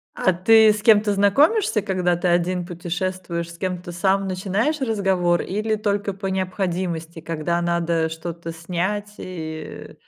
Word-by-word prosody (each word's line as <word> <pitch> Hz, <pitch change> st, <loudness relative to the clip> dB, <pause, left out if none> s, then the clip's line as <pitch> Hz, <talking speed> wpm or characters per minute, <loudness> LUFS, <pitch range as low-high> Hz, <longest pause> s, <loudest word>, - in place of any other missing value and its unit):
А 185 Hz, -, +2 dB
ты 215 Hz, +4 st, +6 dB
с 210 Hz, -, -5 dB
кем-то 215 Hz, -2 st, +5 dB
знакомишься, 225 Hz, -, +3 dB
когда 185 Hz, -3 st, 0 dB
ты 175 Hz, +1 st, -1 dB
один 175 Hz, +1 st, +1 dB
путешествуешь? 175 Hz, -1 st, -4 dB
С -, -, -13 dB
кем-то 180 Hz, -1 st, -4 dB
сам 195 Hz, +3 st, +1 dB
начинаешь 195 Hz, +11 st, -1 dB
разговор, 190 Hz, -7 st, +1 dB
или 215 Hz, +3 st, -1 dB
только 205 Hz, -1 st, -1 dB
по 195 Hz, +1 st, -5 dB
необходимости? 180 Hz, -3 st, -3 dB
Когда 165 Hz, +1 st, -2 dB
надо 170 Hz, -1 st, 0 dB
что-то 165 Hz, +1 st, -6 dB
снять, 185 Hz, +5 st, -3 dB
и, 160 Hz, -3 st, -7 dB
185 Hz, 135 wpm, -22 LUFS, 170-200 Hz, -, ты